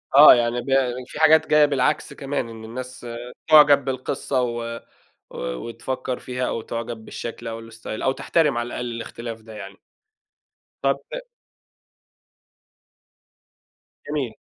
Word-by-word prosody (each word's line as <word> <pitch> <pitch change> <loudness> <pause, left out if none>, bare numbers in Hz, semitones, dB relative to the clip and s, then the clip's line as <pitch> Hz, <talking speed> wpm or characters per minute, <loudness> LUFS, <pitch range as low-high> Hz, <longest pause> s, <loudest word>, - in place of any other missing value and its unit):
آه، 145 +2 +11
يعني 120 0 0
ب - - -12 0.4
في - - -8
حاجات 160 0 +6
جاية 150 -1 +6
بالعكس 145 +1 0
كمان، 140 -4 -3
إن 110 -1 -10
الناس 125 +2 -8 0.4
تُعجَب 145 -3 +7
بالقصة 130 0 -1
و 120 -1 -3 0.5
و - - -11 0.2
وتفكر 125 - -4
فيها 125 0 -3
أو 115 - -2
تُعجَب 115 -1 -5
بالشكل 115 0 -6
أو 115 0 -6
الStyle 115 - -15 0.3
أو 130 - +3
تحترم 150 -1 +1
على 120 0 -1
الأقل 120 0 -4
الاختلاف 115 0 -6
ده 110 0 -12
يعني. 100 -2 -9 1.1
طَب - - +2
أ - - -4 2.9
جميل. 140 -6 -2
125 Hz, 130 wpm, -23 LUFS, 115-140 Hz, 2.9 s, آه